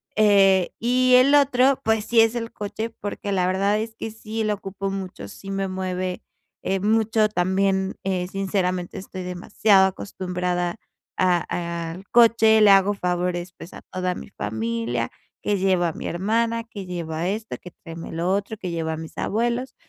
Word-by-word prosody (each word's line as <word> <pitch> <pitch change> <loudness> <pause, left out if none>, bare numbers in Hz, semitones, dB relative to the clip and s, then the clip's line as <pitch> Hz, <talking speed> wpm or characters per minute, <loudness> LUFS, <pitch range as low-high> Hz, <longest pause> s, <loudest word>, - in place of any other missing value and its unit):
eh, 195 -3 +4
y 255 +2 +3
el 265 +3 +6
otro, 275 -2 +4
pues 220 -1 +1
sí 235 - +3
es 225 +1 +3
el 230 -1 -4
coche, 215 +2 -4
porque 205 -2 -6
la 180 -2 +1
verdad 200 +3 +1
es 220 0 -5
que 225 - -5
sí 220 0 -4
lo 210 -1 +1
ocupo 195 0 -5
mucho, 185 - -6
sí 195 - -11
me 195 0 -1
mueve, 185 -1 -3 0.4
eh, 195 +1 -1
mucho. 220 0 +2
También, 190 0 +1
eh, 185 -2 -1
sinceramente, 185 -2 -2
estoy 185 -1 -7
demasiado 190 +2 +3
acostumbrada 180 -2 -3 0.4
a 170 -2 0
al 190 +3 -11
coche, 225 -2 +5
le 205 -1 +7
hago 195 +1 +5
favores 180 -1 -2
pues 170 - -11
a - - -10
toda 185 -1 -1
mi - - -9
familia, 115 - -3 0.3
que 205 - +1
lleva 185 -3 +2
a 160 - -6
mi - - -6
hermana, 230 +6 0
que 210 -4 -9
lleva 170 -1 -3
esto, 215 +3 -3
que 180 - -10
tráeme 165 0 -9
lo 170 +3 -1
otro, 200 +3 -1
que 185 -3 -5
lleva 160 -1 -2
a - - -5
mis 160 0 -9
abuelos, 240 +4 -1
195 Hz, 170 wpm, -23 LUFS, 180-220 Hz, 0.4 s, le